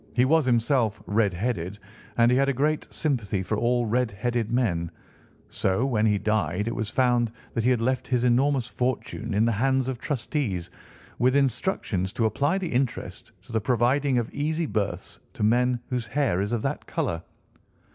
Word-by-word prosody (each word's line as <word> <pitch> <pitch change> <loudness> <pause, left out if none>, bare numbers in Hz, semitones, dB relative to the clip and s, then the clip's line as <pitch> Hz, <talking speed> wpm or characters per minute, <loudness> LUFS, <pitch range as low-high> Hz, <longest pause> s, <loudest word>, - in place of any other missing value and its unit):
He 125 0 +4
was 155 0 +3
himself 115 -2 +2
red 105 -1 +2
headed, 100 -2 -2 0.4
and 120 0 +5
he 125 - +4
had 140 +1 +3
a - - +1
great 150 +4 0
sympathy 110 -10 -1
for 110 - -1
all 120 +2 +1
red 120 +2 +1
headed 115 +2 -2
men; 95 -9 0 0.6
so, 95 +7 0
when 110 -5 +2
he 105 -1 +3
died, 100 -1 0
it 115 - -1
was 110 -3 -2
found 120 -2 +2 0.2
that 115 - -1
he 125 - +3
had 125 -3 +2
left 130 +1 0
his 125 -2 +1
enormous 130 +1 +3
fortune 120 -2 -3
in 110 +2 +3
the 115 - +2
hands 130 +4 +1
of 130 -3 -3
trustees, 120 - -2 0.5
with 130 +2 +3
instructions 120 - 0
to 115 - 0
apply 140 - +1
the 180 -7 -3
interest 120 -6 -2
to 95 - -14
the 110 -1 0
providing 125 +4 +2
of 120 -2 -1
easy 155 +3 -1
berths 105 -8 -3
to - - -4
men 120 +3 +3
whose 125 -3 -2
hair 115 -6 +1
is 100 +2 -2
of 120 -2 -1
that - - -3
colour. 80 -1 -2
120 Hz, 185 wpm, -26 LUFS, 105-130 Hz, 0.6 s, and